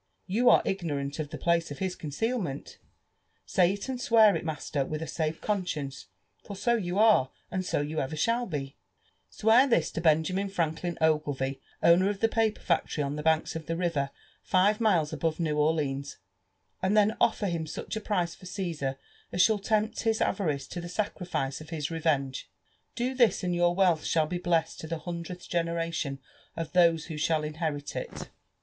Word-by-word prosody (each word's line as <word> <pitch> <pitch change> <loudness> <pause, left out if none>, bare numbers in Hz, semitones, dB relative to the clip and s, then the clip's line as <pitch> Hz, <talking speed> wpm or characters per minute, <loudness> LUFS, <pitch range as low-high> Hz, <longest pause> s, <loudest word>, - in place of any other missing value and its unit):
You 235 +6 +3
are - - +6
ignorant 145 -6 -2
of 150 -2 -3
the 155 - -6
place 170 0 +1
of 145 - -7
his 190 -1 -2
concealmeni— 165 - -3 0.7
say 180 0 +3
ft, 200 - -7
and 260 -2 -3
s^ear 225 -4 +5
it, - - -3
master, 150 -3 -2
with 155 +3 -4
a 160 - -4
safe 160 -1 -2
conscience, 170 -9 -3 0.4
for 200 - -8
so 235 +5 +1
you 185 -4 -2
are, 210 -12 +5 0.2
and 185 0 -1
so 180 - 0
yon 150 +2 -2
ever 135 +4 -3
shaH 230 +9 +1
be; 140 -4 -4 0.5
—swear 225 +5 +4
this 170 - +2
to 165 - -3
Benjamin 170 +5 +2
Franklin 170 -1 -2
Oglevie, 145 -4 +1 0.2
owner 175 +3 +6
of 205 -1 -3
the 225 - +3
paper 225 -1 0
factory 165 -3 0
on 140 +1 -2
the 150 - -4
hanks 160 +1 +1
of 160 -1 -6
the 165 - -1
river 165 -6 0 0.3
five 205 +4 +2
miles 175 -9 +2
above 165 0 -1
New 155 -3 0
Orleans^ 145 -2 0 0.7
lind 195 +3 +2
then 210 +1 +4
ol!l»r 220 -2 +2
him 165 -3 -2
such - - -5
a 220 - -3
price 180 -6 -1
for 185 - -12
Ga^ar 165 -9 -3 0.4
as 180 - +4
shall 220 -2 +3
tempt 215 +2 0
his 225 -1 +1
avarice 150 -9 0
to 175 - -5
the 175 - -6
saeri6ae 175 -7 -3
of 155 - -11
his 155 -2 -3
revenge. 145 -5 -1 0.5
Do 250 +2 -1
this, 235 -7 +3
and 180 -1 0
your 175 0 +2
wealth 180 -5 +3
shall 160 -2 +2
be 175 +3 -3
bleSSted 175 -2 0
to 160 - -6
the 165 +1 -3
hundredth 170 +2 -6
generation 165 -4 -1 0.4
of 165 -1 -4
those 170 -3 +4
who 160 -3 -6
shall 155 0 +1
inherit 150 -2 -3
it.' - - -6
170 Hz, 185 wpm, -28 LUFS, 155-195 Hz, 0.7 s, are